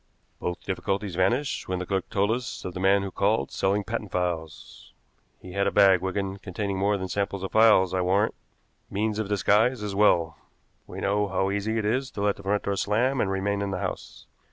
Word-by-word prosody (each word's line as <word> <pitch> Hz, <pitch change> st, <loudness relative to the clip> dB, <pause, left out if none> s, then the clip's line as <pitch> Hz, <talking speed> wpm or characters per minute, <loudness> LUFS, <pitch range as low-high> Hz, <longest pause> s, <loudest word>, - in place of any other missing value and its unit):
Both 90 Hz, 0 st, -4 dB
difficulties 95 Hz, +1 st, -2 dB
vanished 120 Hz, +10 st, 0 dB
when 95 Hz, -, -1 dB
the 90 Hz, -, -4 dB
clerk 95 Hz, 0 st, -2 dB
told 100 Hz, +2 st, +1 dB
us 120 Hz, +1 st, -4 dB
of 90 Hz, -, -4 dB
the 90 Hz, -, -6 dB
man 95 Hz, +1 st, +3 dB
who 100 Hz, -, -5 dB
called 105 Hz, +4 st, 0 dB
selling 100 Hz, +2 st, 0 dB
patent 110 Hz, -1 st, -4 dB
files. 85 Hz, -3 st, -4 dB, 0.5 s
He 90 Hz, -, -11 dB
had 100 Hz, +2 st, 0 dB
a -, -, +1 dB
bag, 95 Hz, -3 st, +5 dB
Wigan, 95 Hz, +1 st, -3 dB
containing 100 Hz, 0 st, -4 dB
more 100 Hz, +1 st, +2 dB
than 95 Hz, -1 st, -4 dB
samples 100 Hz, 0 st, -2 dB
of 95 Hz, -, -4 dB
files, 105 Hz, -5 st, +5 dB
I 95 Hz, -, +1 dB
warrant 95 Hz, +4 st, +2 dB, 0.6 s
means 105 Hz, +1 st, -1 dB
of 105 Hz, -2 st, -2 dB
disguise 105 Hz, +3 st, +2 dB
as 105 Hz, -1 st, -3 dB
well. 85 Hz, -6 st, +2 dB, 0.5 s
We -, -, -7 dB
know 105 Hz, +1 st, +1 dB
how 95 Hz, 0 st, 0 dB
easy 105 Hz, +3 st, -1 dB
it 110 Hz, -, -1 dB
is 130 Hz, +5 st, 0 dB
to -, -, -2 dB
let 105 Hz, -1 st, +2 dB
the -, -, -10 dB
front 100 Hz, +1 st, 0 dB
door 100 Hz, 0 st, -1 dB
slam 120 Hz, +7 st, +1 dB
and 95 Hz, -, 0 dB
remain 100 Hz, +1 st, -1 dB
in 100 Hz, -, -2 dB
the 95 Hz, -, -2 dB
house. -, -, -6 dB
100 Hz, 210 wpm, -26 LUFS, 95-105 Hz, 0.6 s, bag